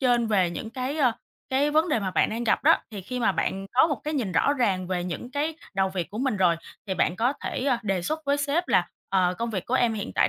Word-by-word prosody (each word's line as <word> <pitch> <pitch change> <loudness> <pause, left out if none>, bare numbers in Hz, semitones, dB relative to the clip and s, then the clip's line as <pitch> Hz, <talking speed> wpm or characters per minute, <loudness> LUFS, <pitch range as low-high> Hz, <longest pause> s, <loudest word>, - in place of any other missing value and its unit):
trên 245 -3 +3
về 190 -5 +2
những 220 +5 -6
cái, 255 +4 -3
ờ, 255 -5 +4 0.4
cái 275 +3 +2
vấn 315 +3 +3
đề 300 - +2
mà 195 -3 -2
bạn - - +2
đang 230 +2 -3
gặp - - +1
đó, - - +6
thì 210 -3 -6
khi 250 +6 -4
mà 235 - +3
bạn 195 0 -2
có 260 - +6
một 295 -4 -2
cái 305 +1 -2
nhìn 230 -10 -1
rõ 170 +12 +3
ràng 195 -9 0
về 180 -1 -2
những 180 +7 -5
cái 300 +3 -2 0.2
đầu 190 0 +2
việc 185 -2 -4
của 210 - -6
mình 260 -3 0
rồi, 180 -3 +3 0.3
thì 190 - -1
bạn 180 - +1
có 240 +5 +2
thể, 255 - -3
ờ, 270 -3 +3
đề 195 -4 -1
xuất 310 - -3
với 280 0 +2
sếp 290 +5 0
là, 175 -1 +3 0.2
ờ, 185 -2 +2
công 235 0 -2
việc 190 -5 -3
của 250 - -1
em 240 -3 +3
hiện 205 -2 -4
tại - - +4
230 Hz, 280 wpm, -26 LUFS, 190-275 Hz, 0.4 s, đó